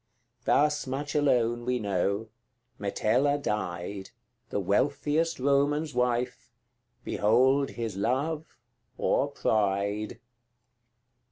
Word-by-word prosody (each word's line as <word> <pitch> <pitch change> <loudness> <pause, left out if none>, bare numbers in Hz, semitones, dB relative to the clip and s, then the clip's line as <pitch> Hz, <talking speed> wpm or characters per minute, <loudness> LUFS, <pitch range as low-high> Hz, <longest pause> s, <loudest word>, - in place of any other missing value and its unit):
Thus 150 0 +2
much 140 +3 -3
alone 120 -5 +2
we 125 +1 0
know 100 0 -1 0.5
Metella 130 +8 +1
died, 95 -4 -3 0.4
The - - -1
wealthiest 145 - +1
Roman's 140 +3 +2
wife: 125 0 -1 0.5
Behold 130 +6 +3
his 115 -5 -5
love 145 +9 -1 0.4
or - - +2
pride! 100 0 0
125 Hz, 85 wpm, -28 LUFS, 105-145 Hz, 0.5 s, Behold